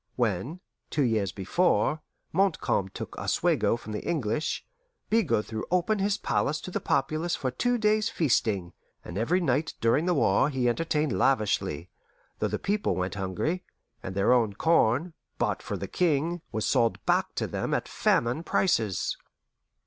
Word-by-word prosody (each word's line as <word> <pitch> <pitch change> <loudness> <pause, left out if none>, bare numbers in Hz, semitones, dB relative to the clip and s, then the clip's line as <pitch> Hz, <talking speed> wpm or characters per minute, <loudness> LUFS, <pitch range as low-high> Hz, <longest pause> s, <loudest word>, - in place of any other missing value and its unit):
When, 120 - -1 0.3
two 150 - +1
years 110 -6 +1
before, 135 - +1 0.3
Montcalm 170 - +1
took - - -7
Oswego 115 - +1
from 110 - -9
the 105 - -3
English, 145 -3 -1 0.5
Bigot 205 - +2
threw 110 -1 -5
open 180 +4 +1
his 200 +1 +1
palace 150 -5 0
to 185 - -7
the - - -1
populace 155 +5 0
for 130 -3 -2
two 245 - +1
days' 215 0 +2
feasting, 110 - 0 0.3
and 85 - -7
every 135 - +1
night 155 -1 0
during 125 +9 +2
the 180 - +2
war 130 +1 +3
he 130 -4 0
entertained 150 +3 0
lavishly, 105 - +1 0.5
though - - +1
the - - -2
people 205 - 0
went 90 +1 -2
hungry, 100 - -2 0.4
and 95 - -6
their 100 +5 +4
own 115 -5 +2
corn, 160 - +2 0.2
bought - - 0
for - - -4
the - - -5
King, 170 0 0
was 110 - -1
sold 115 -1 +1
back - - +1
to - - -1
them - - -3
at - - 0
famine 120 +6 +1
prices. 115 - 0
135 Hz, 155 wpm, -27 LUFS, 110-175 Hz, 0.5 s, their